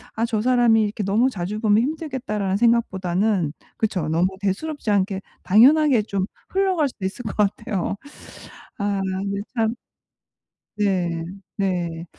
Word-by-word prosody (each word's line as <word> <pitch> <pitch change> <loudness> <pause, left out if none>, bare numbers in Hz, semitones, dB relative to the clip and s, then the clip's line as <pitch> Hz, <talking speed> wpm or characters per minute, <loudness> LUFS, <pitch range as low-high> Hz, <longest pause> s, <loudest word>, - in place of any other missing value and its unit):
'아 225 - +1
저 220 -3 -1
사람이 240 -2 +4
이렇게 210 0 -2
너무 220 +7 +3
자주 205 0 -4
보면 215 0 +4
힘들겠다.'라는 260 - -2
생각보다는 195 -6 +1 0.2
그쵸 190 -8 -1
너무 165 +3 +2
대수롭지 220 +5 -2
않게 195 -1 +1 0.2
당연하게 255 +3 +5
좀 195 -3 -2 0.2
흘러갈 375 -6 +2
수도 200 -6 -7
있을 205 +6 -4
것 210 - -4
같아요. 210 -1 0 0.8
아 200 -1 0
근데 195 +1 -2
참 225 -1 +1 1.0
네. 180 -5 0 0.3
네. 175 -4 -1
210 Hz, 280 characters per minute, -23 LUFS, 190-235 Hz, 1.0 s, 당연하게